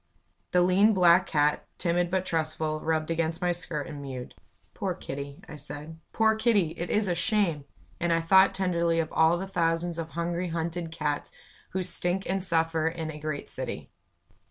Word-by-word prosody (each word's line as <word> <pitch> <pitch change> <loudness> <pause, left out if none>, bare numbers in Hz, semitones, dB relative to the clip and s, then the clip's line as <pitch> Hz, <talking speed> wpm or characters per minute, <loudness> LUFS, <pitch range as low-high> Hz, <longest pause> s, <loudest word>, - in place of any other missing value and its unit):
The 180 0 +4
lean, 200 +4 +4
black 180 0 +5
cat, 150 -1 +1
timid 175 0 +1
but 185 0 0
trustful, 155 -2 -1
rubbed 160 0 -1
against 165 0 -1
my 180 0 +1
skirt 165 -4 -3
and 145 -2 -7
mewed. 130 -3 -7 0.4
"Poor 190 -3 -2
Kitty" 140 -4 -7
I 150 - -9
said; 150 +3 -8
"poor 220 0 +3
Kitty! 220 -6 +2
It 170 +1 -5
is 210 -1 +1
a 180 - +1
shame!" 170 -4 +1 0.3
And 175 0 0
I 165 - +3
thought 190 +4 +5
tenderly 170 -3 +1
of 160 -1 -2
all 160 +2 +4
the 190 - -4
thousands 170 -2 0
of 165 -1 -4
hungry, 170 +1 -1
hunted 165 0 -3
cats 150 -3 -2 0.4
who 185 +1 -2
stink 180 +1 -1
and 190 0 -1
suffer 165 -2 +1
its 165 -1 -3
a 150 - -9
great 155 -1 -4
city. - - -6
170 Hz, 180 wpm, -28 LUFS, 160-180 Hz, 0.4 s, black